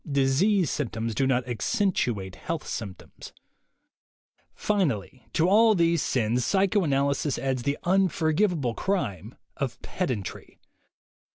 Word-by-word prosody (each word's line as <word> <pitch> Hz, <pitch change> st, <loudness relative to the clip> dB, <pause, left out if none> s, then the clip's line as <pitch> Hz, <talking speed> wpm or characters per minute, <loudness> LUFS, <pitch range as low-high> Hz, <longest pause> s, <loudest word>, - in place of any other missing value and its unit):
Disease 140 Hz, +7 st, +2 dB
symptoms 115 Hz, -5 st, -3 dB
do 135 Hz, +5 st, +1 dB
not 125 Hz, -1 st, +1 dB
"accentuate" 120 Hz, -, -1 dB
health 165 Hz, -2 st, -5 dB
symptoms. 100 Hz, -5 st, -8 dB, 1.2 s
Finally, 135 Hz, -, -1 dB
to 165 Hz, -, +2 dB
all 220 Hz, +3 st, +5 dB
these 170 Hz, -3 st, +2 dB
sins, 120 Hz, 0 st, 0 dB
psychoanalysis 150 Hz, -, +1 dB
adds 130 Hz, -2 st, -1 dB
the 140 Hz, +4 st, -1 dB
unforgivable 175 Hz, -, +1 dB
crime 110 Hz, -, -3 dB, 0.2 s
of 125 Hz, -4 st, -3 dB
pedantry. 125 Hz, -, -4 dB
140 Hz, 100 wpm, -26 LUFS, 120-180 Hz, 1.2 s, all